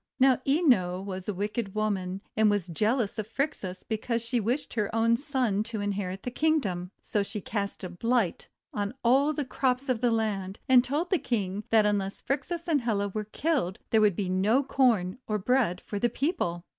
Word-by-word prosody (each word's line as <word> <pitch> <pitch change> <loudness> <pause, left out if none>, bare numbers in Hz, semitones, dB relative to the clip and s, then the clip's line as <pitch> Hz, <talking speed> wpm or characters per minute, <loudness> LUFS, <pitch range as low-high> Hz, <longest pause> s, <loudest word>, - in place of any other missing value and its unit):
Now 260 -1 +5
Ino 250 - +3
was 190 0 -5
a - - 0
wicked 205 +1 -3
woman, 195 -3 -1
and 220 -1 +4
was 205 -4 +1
jealous 215 - 0
of 215 - -3
Phrixus 220 -9 -3
because 230 +2 -1
she 235 +1 0
wished 240 +7 -2
her 210 -3 0
own 230 +1 +4
son 250 -6 0
to 225 -1 -4
inherit 200 -2 -3
the 245 - -3
Kingdom. 235 - 0
So 210 - 0
she 205 +2 -4
cast 200 0 -4
a 185 - -4
blight 225 +1 0 0.2
on 205 +3 -2
all 270 +5 +4
the 295 -2 -2
crops 260 +1 0
of 240 -3 +1
the 245 - +3
land, 210 -4 -1
and 255 -2 +7
told 300 +8 -2
the 370 - +3
King 205 -3 -2
that 220 -2 +5
unless 200 -2 0
Phrixus 330 +5 -3
and 305 -5 +2
Helle 205 -4 0
were 215 -1 -2
killed 235 - -1
there 220 - +5
would 210 -4 +4
be 195 0 -2
no 200 +9 +2
Corn 245 -7 +2
or 215 - 0
bread 215 -4 +1
for 205 - -5
the 240 - +2
people. 230 - -2
215 Hz, 195 wpm, -28 LUFS, 195-255 Hz, 0.2 s, and